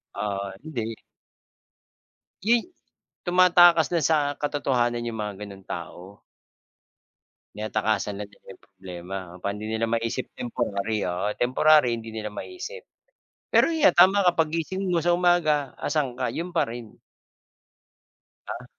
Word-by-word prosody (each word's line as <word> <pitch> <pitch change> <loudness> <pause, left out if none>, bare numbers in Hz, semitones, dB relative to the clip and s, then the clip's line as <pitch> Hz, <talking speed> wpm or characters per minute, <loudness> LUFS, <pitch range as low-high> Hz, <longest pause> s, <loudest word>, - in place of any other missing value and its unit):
Ah, 100 -1 -3
hindi. 115 -8 -4 1.5
Yuy 235 - +2 0.6
tumatakas 175 -2 +6
dun 170 -4 +1
sa 145 -3 +1
katotohanan 125 -5 0
yung 115 -1 -4
mga 105 -1 -3
gano'ng 100 -2 -10
tao. 90 +3 -8 1.3
Tinatakasan 105 -1 -1
na 105 - -5
nila 100 - -25
yung - - -14
problema, 95 -1 -9 0.2
kapag 100 +2 -3
hindi 105 +1 -6
nila 110 +1 0
maisip 115 +2 -2
temporary, 105 -3 -2
oo, 90 +4 -1
temporary 130 0 +4
hindi 115 -1 -8
nila 110 -1 -5
maisip. 370 - -7 0.7
Pero - - +5
yan 315 -2 +4
tama 190 +2 +5
ka, 180 - +5
paggising 165 +4 -1
mo 170 -2 0
sa 175 - +4
umaga 175 -5 +2
asaan 140 -5 -1
ka? 130 -1 -2
Yun 170 +2 -4
pa 170 -2 +1
rin. 115 -2 -9 1.5
Ah. 125 - -6
120 Hz, 130 wpm, -25 LUFS, 105-170 Hz, 1.5 s, tumatakas